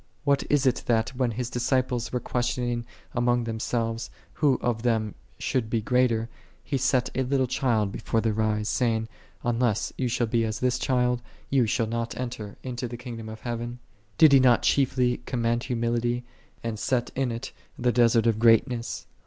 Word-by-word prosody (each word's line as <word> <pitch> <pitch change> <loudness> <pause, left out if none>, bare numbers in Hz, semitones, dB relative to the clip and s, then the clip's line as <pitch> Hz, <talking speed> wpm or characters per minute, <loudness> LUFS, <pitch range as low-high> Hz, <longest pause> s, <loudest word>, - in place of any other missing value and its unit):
What 140 -1 +3
is 145 -2 +3
it 130 - +2
that, 115 -2 +2
when 125 -1 -1
His 120 +2 -3
disciples 125 -1 0
were 125 - 0
questioning 120 -1 -2 0.3
among 120 0 +2
themselves, 115 0 -2 0.2
who 140 -4 +2
of 120 -2 -1
them 110 -3 0 0.2
should 120 -4 -1
be 115 - +1
greater, 115 0 +2 0.4
He 140 -2 -2
set 125 0 +1
a 130 - 0
little 130 0 +1
child 115 -5 +1
before 115 - -1
their 110 -1 0
eyes, 105 -1 0
saying, 110 -2 0 0.2
" - - -32
Unless 120 -3 0
ye 130 - +1
shall 120 0 +1
be 115 +1 +1
as 110 -1 -2
this 125 0 +1
child, 125 -2 +1 0.3
ye 130 -4 +3
shall 115 +1 +1
not 115 +1 -3
enter 115 -5 -5
into 125 -1 -4
the 120 0 -7
Kingdom 115 -3 -7
of 110 0 -9
Heaven?"10 120 0 -4 0.4
Did 155 -3 +7
He 135 - +8
not 125 -2 +4
chiefly 130 -3 +2
commend 120 -1 0
humility, 120 0 0 0.4
and 115 -2 -3
set 125 -1 0
in 130 -2 0
it 115 0 -5 0.3
the 125 0 +2
desert 115 -1 +4
of 115 -2 +2
greatness 115 +1 +2
120 Hz, 180 wpm, -26 LUFS, 115-125 Hz, 0.4 s, He